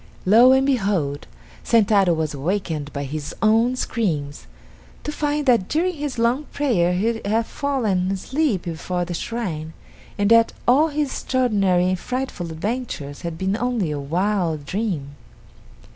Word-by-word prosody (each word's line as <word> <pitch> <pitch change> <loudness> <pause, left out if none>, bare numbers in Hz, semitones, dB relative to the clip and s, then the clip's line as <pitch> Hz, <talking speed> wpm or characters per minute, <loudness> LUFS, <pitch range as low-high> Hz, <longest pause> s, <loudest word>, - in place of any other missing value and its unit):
Lo, 230 +7 +7
and 265 0 +4
behold, 195 - 0 0.4
Sentaro 205 -5 +4
was 160 -2 -1
awakened 155 -1 -2
by 140 0 -4
his 145 +1 -5
own 225 +4 +4
screams, 155 - -2 0.6
to 300 - -3
find 295 -1 -1
that 235 -8 +3
during 355 +4 0
his 290 -5 -4
long 240 +6 +1
prayer 220 -15 +1
he 225 +5 0
had 220 +3 +1
fallen 225 -12 -1
asleep 220 - -1
before 175 +1 -3
the 175 - -5
shrine, 165 -7 -4 0.4
and 205 +1 +1
that 230 0 +5
all 280 +6 +5
his 295 -2 -1
extraordinary 200 -10 +1
and 185 -1 -1
frightful 250 -9 -4
adventures 160 - -4
had 170 -1 -5
been 190 +2 0
only 235 -8 -1
a 145 - -3
wild 170 0 -1
dream. 180 -6 -3
205 Hz, 145 wpm, -22 LUFS, 170-250 Hz, 0.6 s, Lo